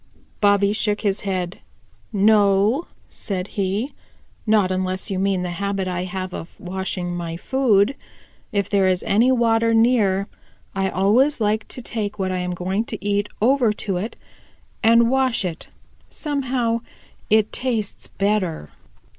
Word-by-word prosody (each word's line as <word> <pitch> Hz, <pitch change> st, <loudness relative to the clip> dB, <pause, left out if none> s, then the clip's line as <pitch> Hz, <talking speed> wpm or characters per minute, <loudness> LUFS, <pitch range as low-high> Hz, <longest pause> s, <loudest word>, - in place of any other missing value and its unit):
Bobby 200 Hz, -1 st, +4 dB
shook 210 Hz, -1 st, 0 dB
his 200 Hz, -2 st, 0 dB
head. 185 Hz, -2 st, -3 dB, 0.5 s
"No," 205 Hz, -, +3 dB, 0.2 s
said 190 Hz, -1 st, -4 dB
he, 205 Hz, +7 st, -2 dB, 0.5 s
"not 210 Hz, -4 st, +3 dB
unless 185 Hz, +1 st, -2 dB
you 190 Hz, -, -1 dB
mean 190 Hz, -1 st, +1 dB
the 180 Hz, -, -3 dB
habit 200 Hz, -1 st, -1 dB
I 180 Hz, 0 st, -2 dB
have 185 Hz, 0 st, -5 dB
of 165 Hz, -, -8 dB
washing 180 Hz, -1 st, -3 dB
my 170 Hz, -1 st, -4 dB
food. 250 Hz, 0 st, +2 dB, 0.6 s
If 200 Hz, -1 st, 0 dB
there 195 Hz, -2 st, +2 dB
is 185 Hz, -1 st, +1 dB
any 230 Hz, +6 st, +3 dB
water 230 Hz, -2 st, +3 dB
near, 215 Hz, -4 st, +3 dB, 0.5 s
I 195 Hz, 0 st, 0 dB
always 230 Hz, +12 st, +3 dB
like 215 Hz, 0 st, 0 dB
to 250 Hz, -, -7 dB
take 210 Hz, -3 st, -3 dB
what 190 Hz, -2 st, -1 dB
I 185 Hz, -, -1 dB
am 180 Hz, 0 st, -2 dB
going 190 Hz, +4 st, -1 dB
to 215 Hz, -3 st, -7 dB
eat 205 Hz, 0 st, 0 dB
over 250 Hz, -2 st, +4 dB
to 195 Hz, -3 st, -3 dB
it 210 Hz, +6 st, -4 dB, 0.7 s
and 230 Hz, +1 st, +5 dB
wash 260 Hz, -6 st, +2 dB
it; 170 Hz, -3 st, -5 dB, 0.4 s
somehow 255 Hz, -6 st, -1 dB, 0.5 s
it 215 Hz, 0 st, +3 dB
tastes 235 Hz, -5 st, -2 dB
better." 195 Hz, -, -1 dB
205 Hz, 145 wpm, -22 LUFS, 190-230 Hz, 0.7 s, and